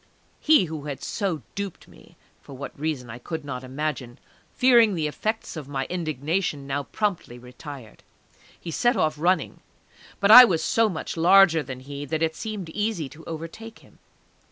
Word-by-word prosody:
He 305 Hz, -10 st, +4 dB
who 155 Hz, -3 st, -7 dB
had 145 Hz, -2 st, -6 dB
so 190 Hz, -8 st, -3 dB
duped 200 Hz, -3 st, -6 dB
me -, -, -19 dB, 0.2 s
(for 135 Hz, -, -12 dB
what 140 Hz, -, -6 dB
reason 145 Hz, -6 st, -3 dB
I 120 Hz, -, -9 dB
could 160 Hz, +4 st, -6 dB
not 130 Hz, -2 st, -6 dB
imagine), 130 Hz, -2 st, -4 dB, 0.4 s
fearing 235 Hz, -5 st, +5 dB
the 160 Hz, -3 st, -1 dB
effects 215 Hz, +10 st, -3 dB
of 155 Hz, -4 st, -7 dB
my 135 Hz, -2 st, -3 dB
indignation, 155 Hz, -2 st, -2 dB
now 140 Hz, +1 st, -2 dB
promptly 180 Hz, -, -3 dB
retired. 125 Hz, -1 st, -11 dB, 0.6 s
He 170 Hz, -, -7 dB
set 240 Hz, -, +1 dB
off 155 Hz, -1 st, +1 dB
running; 180 Hz, +4 st, 0 dB, 0.6 s
but 200 Hz, +1 st, +4 dB
I 250 Hz, +3 st, +13 dB
was 170 Hz, -9 st, +1 dB
so 225 Hz, +6 st, +2 dB
much 170 Hz, -2 st, -5 dB
larger 175 Hz, -1 st, +6 dB
than 130 Hz, -3 st, -8 dB
he 140 Hz, +2 st, -7 dB
that 160 Hz, +3 st, -2 dB
it 160 Hz, 0 st, 0 dB
seemed 210 Hz, -6 st, -6 dB
easy 205 Hz, -5 st, -2 dB
to 160 Hz, +3 st, -14 dB
overtake 165 Hz, +8 st, -8 dB
him. -, -, -23 dB
160 Hz, 170 wpm, -24 LUFS, 140-195 Hz, 0.6 s, I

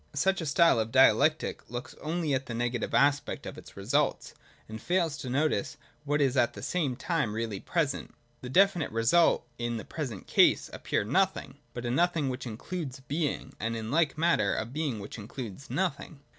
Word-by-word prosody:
Such 190 Hz, +5 st, +2 dB
a 160 Hz, -, -3 dB
style 155 Hz, -2 st, +4 dB
of 110 Hz, +1 st, -2 dB
dialectic 140 Hz, +4 st, +3 dB
looks 120 Hz, +1 st, -6 dB
only 160 Hz, -1 st, -1 dB
at 135 Hz, +1 st, -1 dB
the 115 Hz, -, -4 dB
negative 120 Hz, 0 st, -2 dB
aspect 145 Hz, +1 st, +2 dB
of -, -, -6 dB
its -, -, -13 dB
result, -, -, 0 dB, 0.3 s
and 110 Hz, 0 st, -8 dB
fails 170 Hz, -3 st, +1 dB
to 130 Hz, -, -6 dB
notice, 150 Hz, +2 st, 0 dB, 0.3 s
what 145 Hz, +1 st, +1 dB
is 135 Hz, -2 st, +2 dB
at 120 Hz, -3 st, +3 dB
the -, -, -9 dB
same 155 Hz, -8 st, -1 dB
time 135 Hz, -5 st, -1 dB
really 110 Hz, -3 st, -3 dB
present, 155 Hz, -, -2 dB, 0.3 s
the 125 Hz, -, -7 dB
definite 180 Hz, 0 st, +3 dB
result, 115 Hz, +11 st, +3 dB
in 120 Hz, -1 st, -2 dB
the 110 Hz, -, -7 dB
present 130 Hz, -, -5 dB
case -, -, +4 dB
a -, -, -7 dB
pure -, -, -1 dB
nothing, -, -, 0 dB, 0.2 s
but 120 Hz, 0 st, -5 dB
a 120 Hz, -, -1 dB
Nothing 165 Hz, 0 st, +1 dB
which 130 Hz, 0 st, -5 dB
includes 135 Hz, +4 st, -5 dB
Being, 145 Hz, -1 st, -3 dB
and, 115 Hz, +1 st, -2 dB
in 110 Hz, +1 st, -5 dB
like 160 Hz, -1 st, +2 dB
manner, 170 Hz, +2 st, +2 dB
a 110 Hz, -, -2 dB
Being 135 Hz, 0 st, -3 dB
which 105 Hz, +3 st, -8 dB
includes 115 Hz, +3 st, -8 dB
Nothing. 175 Hz, -5 st, -2 dB
135 Hz, 185 wpm, -29 LUFS, 120-160 Hz, 0.3 s, style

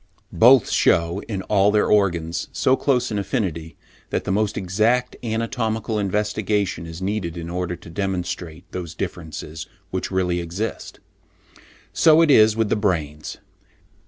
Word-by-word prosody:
Both 125 Hz, +1 st, +6 dB
shew, 85 Hz, +4 st, +2 dB
in 100 Hz, -4 st, -4 dB
all 100 Hz, -1 st, +3 dB
their 105 Hz, 0 st, +3 dB
organs, 85 Hz, -5 st, +1 dB
so 130 Hz, -, +2 dB
close 125 Hz, -4 st, 0 dB
an 105 Hz, -, -1 dB
affinity, 90 Hz, -, -3 dB, 0.3 s
that -, -, -1 dB
the -, -, -2 dB
most 105 Hz, +1 st, 0 dB
exact 110 Hz, +7 st, +1 dB
anatomical 115 Hz, -1 st, -2 dB
investigation 105 Hz, -2 st, -1 dB
is 85 Hz, +3 st, -8 dB
needed 95 Hz, -4 st, -2 dB
in 85 Hz, 0 st, -6 dB
order 90 Hz, 0 st, -2 dB
to 85 Hz, -, -15 dB
demonstrate 90 Hz, -3 st, -4 dB
those 85 Hz, -3 st, -6 dB
differences 80 Hz, 0 st, -6 dB, 0.2 s
which 95 Hz, -, -3 dB
really 90 Hz, -2 st, 0 dB
exist. 90 Hz, +6 st, -5 dB, 0.9 s
So 160 Hz, 0 st, +5 dB
it 155 Hz, -, +4 dB
is 110 Hz, -4 st, +6 dB
with 110 Hz, -2 st, 0 dB
the -, -, +2 dB
brains. 80 Hz, -8 st, -2 dB
100 Hz, 140 wpm, -22 LUFS, 85-110 Hz, 0.9 s, Both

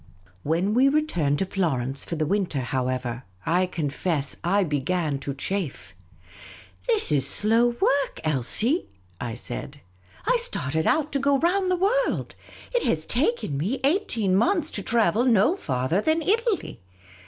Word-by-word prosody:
When 170 Hz, -, 0 dB
we 260 Hz, +4 st, +4 dB
returned 175 Hz, -, +1 dB
to 195 Hz, -, 0 dB
Florence 140 Hz, -9 st, -1 dB
for 170 Hz, -, -4 dB
the 155 Hz, -1 st, -1 dB
winter, 180 Hz, -5 st, -1 dB
however, 125 Hz, -1 st, -2 dB, 0.2 s
I 180 Hz, +3 st, +2 dB
confess 155 Hz, -2 st, -2 dB
I 195 Hz, +4 st, +2 dB
began 150 Hz, -1 st, -1 dB
to 140 Hz, +1 st, -4 dB
chafe. 180 Hz, 0 st, -4 dB, 0.5 s
" -, -, -19 dB
This 450 Hz, -4 st, +3 dB
is 140 Hz, -2 st, +3 dB
slow 230 Hz, +6 st, +3 dB
work, 280 Hz, 0 st, +1 dB
Elsie! 160 Hz, -, +2 dB, 0.2 s
" 90 Hz, -1 st, -19 dB
I -, -, -6 dB
said. 130 Hz, +3 st, -6 dB, 0.2 s
" 95 Hz, -, -26 dB
I -, -, +3 dB
started 160 Hz, -, 0 dB
out 310 Hz, -1 st, +1 dB
to 280 Hz, -, 0 dB
go 280 Hz, 0 st, +2 dB
round 365 Hz, +5 st, +1 dB
the 365 Hz, -, +2 dB
world; 445 Hz, +8 st, 0 dB, 0.4 s
it -, -, +2 dB
has -, -, +1 dB
taken 310 Hz, -, -1 dB
me 210 Hz, -, -1 dB
eighteen 265 Hz, -, +1 dB
months 320 Hz, -, +1 dB
to 205 Hz, -, -1 dB
travel 230 Hz, +2 st, +2 dB
no 240 Hz, -, +4 dB
farther 130 Hz, -, -1 dB
than 315 Hz, +5 st, +1 dB
Italy 435 Hz, -, 0 dB
195 Hz, 155 wpm, -25 LUFS, -, 0.5 s, we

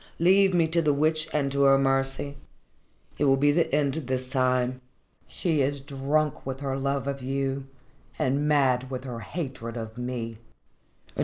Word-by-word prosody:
Leave 190 Hz, +3 st, +5 dB
me 170 Hz, -3 st, +3 dB
to 165 Hz, +1 st, +1 dB
the 150 Hz, -3 st, +2 dB
Witch 155 Hz, +2 st, +3 dB
and 140 Hz, -2 st, 0 dB
to 140 Hz, 0 st, 0 dB
her 135 Hz, 0 st, +6 dB
mercy. 135 Hz, +1 st, 0 dB, 0.8 s
It 145 Hz, -, +2 dB
will 135 Hz, -1 st, +4 dB
be 145 Hz, +2 st, +4 dB
the 165 Hz, +3 st, +1 dB
end 140 Hz, -1 st, +1 dB
this 130 Hz, -4 st, -3 dB
time. 130 Hz, -1 st, +1 dB, 0.5 s
She 160 Hz, -5 st, 0 dB
is 140 Hz, +1 st, 0 dB
drunk 140 Hz, +2 st, -1 dB
with 135 Hz, +1 st, -5 dB
her 135 Hz, -1 st, -2 dB
love 140 Hz, 0 st, -1 dB
of 140 Hz, -1 st, -3 dB
you 135 Hz, +1 st, -2 dB, 0.5 s
and 140 Hz, +3 st, 0 dB
mad 130 Hz, -4 st, +2 dB
with 130 Hz, -1 st, -5 dB
her 125 Hz, -3 st, -6 dB
hatred 125 Hz, -2 st, -5 dB
of 110 Hz, +1 st, -7 dB
me." 120 Hz, -3 st, -4 dB
135 Hz, 165 wpm, -26 LUFS, 130-145 Hz, 0.8 s, her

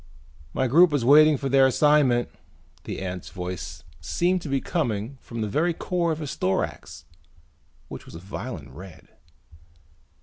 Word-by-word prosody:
"My 130 Hz, -, 0 dB
group 160 Hz, +6 st, +5 dB
is 135 Hz, -5 st, 0 dB
waiting 150 Hz, +2 st, +6 dB
for 135 Hz, -, -3 dB
their 135 Hz, 0 st, +5 dB
assignment." 130 Hz, -3 st, +3 dB, 0.6 s
The -, -, -5 dB
ant's 90 Hz, -1 st, -6 dB
voice 85 Hz, -4 st, -6 dB, 0.2 s
seemed 175 Hz, -, 0 dB
to 155 Hz, -, -7 dB
be 135 Hz, 0 st, +1 dB
coming 125 Hz, -, -3 dB
from 115 Hz, -1 st, -7 dB
the 110 Hz, -, -1 dB
very 165 Hz, -, 0 dB
core 175 Hz, -1 st, -1 dB
of 155 Hz, 0 st, -3 dB
its 145 Hz, -, -5 dB
thorax 95 Hz, +1 st, -3 dB, 0.8 s
which -, -, -10 dB
was -, -, -11 dB
a -, -, -7 dB
violent 95 Hz, -, -7 dB
red. 90 Hz, +5 st, -13 dB
130 Hz, 155 wpm, -25 LUFS, 95-150 Hz, 0.8 s, waiting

